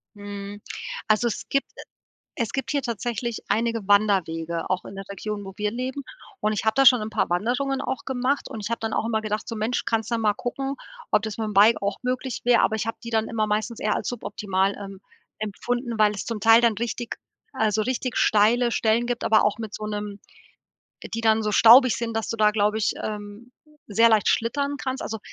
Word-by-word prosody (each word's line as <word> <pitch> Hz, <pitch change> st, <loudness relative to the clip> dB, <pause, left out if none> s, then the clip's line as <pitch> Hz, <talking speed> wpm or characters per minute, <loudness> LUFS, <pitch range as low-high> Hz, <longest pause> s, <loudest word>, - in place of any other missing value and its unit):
Mhm. 205 Hz, 0 st, -8 dB, 0.5 s
Also, 215 Hz, +2 st, +3 dB
es 230 Hz, -, -4 dB
gibt 275 Hz, -, 0 dB, 0.7 s
es 230 Hz, -, -1 dB
gibt 270 Hz, +1 st, -2 dB
hier 285 Hz, -, +1 dB
tatsächlich 235 Hz, -1 st, -3 dB
einige 230 Hz, -2 st, 0 dB
Wanderwege, 170 Hz, -5 st, +1 dB
auch 185 Hz, 0 st, -1 dB
in -, -, -9 dB
der 195 Hz, -, -6 dB
Region, 205 Hz, +1 st, -5 dB
wo 195 Hz, -1 st, -9 dB
wir 210 Hz, 0 st, -1 dB
leben 255 Hz, +3 st, -4 dB, 0.4 s
und 215 Hz, 0 st, 0 dB
ich 210 Hz, -, -2 dB
habe 220 Hz, 0 st, +2 dB
da 270 Hz, 0 st, +4 dB
schon 250 Hz, -2 st, +7 dB
'n 215 Hz, -, -4 dB
paar -, -, 0 dB
Wanderungen 250 Hz, +9 st, 0 dB
auch 260 Hz, -, -4 dB
gemacht 265 Hz, +2 st, -1 dB
und 220 Hz, -, -6 dB
ich 200 Hz, -, -3 dB
habe 230 Hz, -, -2 dB
dann 225 Hz, 0 st, -3 dB
auch -, -, 0 dB
immer 220 Hz, -1 st, 0 dB
gedacht 215 Hz, 0 st, -3 dB
so: 230 Hz, -, -4 dB
„Mensch, 220 Hz, +4 st, -1 dB
kannst 225 Hz, -1 st, -1 dB
ja 235 Hz, -, +1 dB
mal 215 Hz, -2 st, +2 dB
gucken, 270 Hz, +2 st, -3 dB, 0.4 s
ob 210 Hz, -, +4 dB
das 220 Hz, -2 st, -4 dB
mit'm 220 Hz, -1 st, -2 dB
Bike 210 Hz, +4 st, +5 dB
auch 200 Hz, 0 st, -1 dB
möglich 255 Hz, 0 st, -2 dB
wäre.“ 245 Hz, -1 st, +5 dB
Aber 220 Hz, -, +2 dB
ich 215 Hz, -, -2 dB
habe 225 Hz, -, -2 dB
die 230 Hz, -, -6 dB
dann 225 Hz, -1 st, 0 dB
immer 220 Hz, -2 st, 0 dB
meistens 215 Hz, +2 st, -2 dB
eher 210 Hz, 0 st, +1 dB
als -, -, -3 dB
suboptimal, 200 Hz, -5 st, -1 dB
ähm, 195 Hz, -1 st, -9 dB, 0.4 s
empfunden, 235 Hz, +3 st, -3 dB
weil 210 Hz, -1 st, +4 dB
es 200 Hz, -, -5 dB
zum 230 Hz, -2 st, -4 dB
Teil 225 Hz, +2 st, +6 dB
dann 235 Hz, -2 st, +3 dB
richtig 235 Hz, +1 st, -4 dB, 0.3 s
also 220 Hz, -5 st, +1 dB
richtig 255 Hz, +1 st, -2 dB
steile 235 Hz, +3 st, +3 dB
Stellen 225 Hz, +1 st, +2 dB
gibt, 245 Hz, -1 st, -2 dB
aber 215 Hz, -, +4 dB
auch 210 Hz, 0 st, +1 dB
mit 220 Hz, -2 st, -7 dB
so 215 Hz, -, -5 dB
'nem 210 Hz, -1 st, -5 dB, 1.0 s
die 230 Hz, -, -2 dB
dann 220 Hz, -1 st, +3 dB
so 210 Hz, -, 0 dB
staubig 240 Hz, +3 st, +7 dB
sind, 230 Hz, -1 st, -3 dB
dass 225 Hz, -, -2 dB
du -, -, -2 dB
da, 215 Hz, -1 st, +4 dB
glaube 210 Hz, 0 st, +1 dB
ich, 215 Hz, -, 0 dB
ähm, 210 Hz, +3 st, -7 dB, 0.3 s
sehr 230 Hz, +3 st, +4 dB
leicht 220 Hz, -3 st, +3 dB
schlittern 280 Hz, +5 st, 0 dB
kannst. 260 Hz, 0 st, -3 dB
Also, 220 Hz, -, -4 dB
220 Hz, 215 wpm, -24 LUFS, 210-240 Hz, 1.0 s, schon